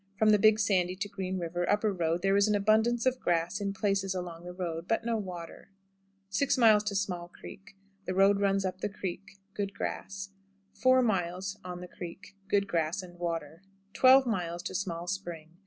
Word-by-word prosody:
From 215 +1 +4
the 210 - +5
Big 215 +1 +6
Sandy 185 -4 +1
to 205 +2 -3
Green 190 -1 -4
River 175 0 -2
(upper 210 0 +2
road) 170 -1 -1
there 195 0 +3
is 200 +1 +4
an 210 - +2
abundance 220 +4 +2
of 255 0 +2
grass 175 +2 0
in 200 -1 -1
places 195 -1 0
along 175 -2 -6
the 180 - -6
road, 175 -2 -4
but 225 0 0
no 235 -1 0
water. 180 -4 -7 0.6
6. 235 +8 +1
Small 205 -6 +2
Creek. 195 +2 -13 0.3
The 185 - -3
road 195 +1 +5
runs 195 -1 +1
up 185 0 -4
the - - -1
creek. 195 +1 -6 0.2
Good 200 -2 -3
grass. 195 0 -5 0.4
4. 255 -1 +4
On 180 -1 -3
the 180 - -7
Creek. 180 +3 -10
Good 200 0 +2
grass 170 +1 -1
and 175 -1 -13
water. 165 -2 -4 0.3
12. 265 +1 +7 0.5
Small 175 -3 -3
Spring. 175 -4 -5
195 Hz, 170 wpm, -30 LUFS, 175-205 Hz, 0.6 s, 12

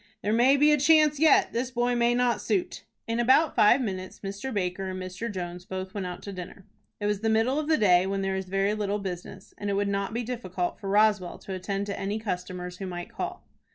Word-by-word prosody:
"There 210 +2 +1
may 255 +5 +5
be 295 +2 +5
a 300 - +4
chance 300 0 +4
yet. 315 -2 +5
This 245 +2 -1
boy 245 0 0
may 240 0 +2
not 240 -4 +1
suit." 205 -4 -2 0.2
In 230 +1 -1
about 260 +6 +4
five 220 +5 +5
minutes 185 -5 -5
Mr. 200 +6 -5
Baker 190 -2 -2
and 185 0 -5
Mr. 185 +5 -5
Jones 180 -2 -6
both 185 +1 -6
went 200 -4 -3
out 180 - -7
to 200 - -6
dinner. 185 +1 -9 0.3
It 205 - -3
was 210 -1 0
the 225 +1 0
middle 225 +6 +2
of 305 - -3
the 315 -1 +3
day, 185 -2 +4
when 195 0 -1
there 195 0 -1
is 190 0 -3
very 195 +2 0
little 205 -1 -1
business, 185 -3 -7
and 205 - -3
it - - 0
would 200 +1 0
not 200 0 -1
be 235 +2 -2
difficult 190 -7 -3
for 195 - -5
Roswell 205 -3 +2
to 195 - -8
attend 195 +2 -3
to 200 -1 -4
any 200 +2 -2
customers 180 -3 -5
who 195 - -4
might 175 +4 -6
call. 360 +7 -5
205 Hz, 235 wpm, -27 LUFS, 185-235 Hz, 0.3 s, may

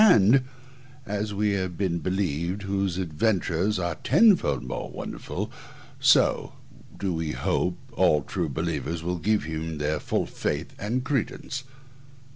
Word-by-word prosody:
And, 125 - +6 0.6
as 105 +1 -2
we 105 +1 +1
have 95 -3 -2
been 90 -4 0
believed, 90 +1 -1
whose 95 -2 -1
adventures 95 +2 +1
are 85 -1 -1
tenfold 220 -5 +4
more - - -4
wonderful, - - -5 0.5
so - - +4 0.4
do 95 -2 -1
we 80 -2 -2
hope - - 0 0.2
all 75 -1 +3
true 85 -1 -2
believers 80 +4 -2
will 90 +1 -2
give 105 +5 +2
him 80 0 -4
their 75 +1 0
full - - 0
faith - - -3
and 120 +5 -1
credence. 135 +1 -2
95 Hz, 130 wpm, -26 LUFS, 80-105 Hz, 0.6 s, And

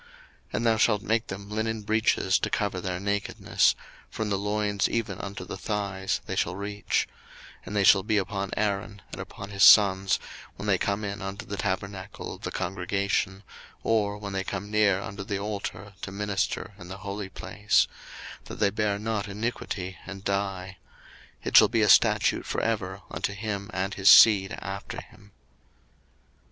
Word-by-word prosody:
02:028:042 480 - -23 0.5
And 115 - -1
thou 115 -1 +4
shalt 105 -2 +3
make 115 0 0
them 100 +1 -7
linen 110 +1 -2
breeches 105 -3 +2
to - - -1
cover 100 -3 -1
their 90 -1 -3
nakedness; 100 +1 +1 0.3
from 110 -2 -3
the 100 - +2
loins 105 0 0
even 105 -5 -2
unto 100 -2 -6
the - - -7
thighs 100 -2 -2
they - - -4
shall 85 - 0
reach: 100 +1 -1 0.5
02:028:043 - - -22
And 105 - -5
they 100 - +3
shall 95 0 +7
be 105 +2 0
upon 100 0 -2
Aaron, 100 -1 -2
and - - -6
upon 100 +1 -9
his 100 -1 -4
sons, 95 -3 +7 0.4
when 100 - -7
they 100 -3 +2
come 100 +1 -1
in 100 +1 -4
unto 95 +1 -5
the 100 - -5
tabernacle 100 0 -4
of - - -12
the - - -3
congregation, 95 +1 -1 0.4
or 105 -2 +1
when 100 -1 -6
they 95 0 -1
come 100 +1 -5
near 105 -3 +3
unto 100 0 -6
the 100 0 -3
altar 100 -1 -5
to 95 - -5
minister 105 +1 -2
in 90 - -10
the 95 +2 -7
holy 100 0 -4
place; 100 -10 +1 0.6
that - - -8
they 100 -1 +2
bear 105 -1 0
not 110 0 -2
iniquity, 100 -3 -4
and 100 0 -8
die: 95 -2 -2 0.7
it - - -3
shall - - +9
be - - +1
a - - +3
statute - - +4
for - - -1
ever 100 -4 -2
unto 100 - -2
him 100 0 -4
and 95 0 -2
his 95 0 +4
seed 100 -4 +8
after 100 +5 -6
him. 105 -3 -16
100 Hz, 175 wpm, -27 LUFS, 95-105 Hz, 0.7 s, shall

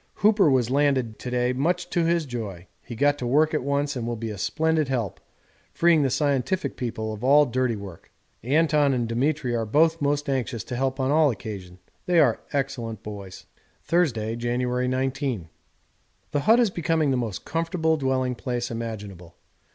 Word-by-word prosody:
Hooper 205 -5 +4
was 125 -3 +2
landed 135 -5 +1
to 125 - -5
day, 125 0 +1
much 175 +7 0
to 170 - +1
his 170 -1 +1
joy. 105 -9 -6 0.2
He 120 - -8
got 145 +4 +2
to 125 - -3
work 150 +5 +3
at 150 - +1
once, 140 +2 -1
and 120 -2 -3
will 120 - -2
be 115 0 -5
a 105 - -7
splendid 160 +7 +1
help, 120 -7 -2 0.5
freeing 170 -2 +4
the 135 - +2
scientific 145 +6 0
people 110 -3 -4
of 110 +2 -9
all 145 +3 +6
dirty 125 -2 0
work. 100 -5 -10 0.3
Anton 145 +1 +2
and 120 -2 -1
Demetri 125 +2 0
are 115 - 0
both 160 +9 +2
most 145 +1 0
anxious 130 -4 -2
to 125 - -6
help 135 +1 -1
on 130 +1 +1
all 155 0 +4
occasions; 100 -5 -6 0.3
they 175 -2 +4
are - - +4
excellent 130 -6 -3
boys. 100 -3 -9 0.4
Thursday, 115 -11 +1
January 125 +1 -1
19. 130 - -2 0.8
The 145 - +1
hut 230 +2 +7
is 230 -5 +3
becoming 160 -4 +1
the - - +2
most 115 -6 -3
comfortable 165 0 0
dwelling 130 -3 0
place 120 -1 -3
imaginable. 105 -7 -7
130 Hz, 175 wpm, -25 LUFS, 115-150 Hz, 0.8 s, hut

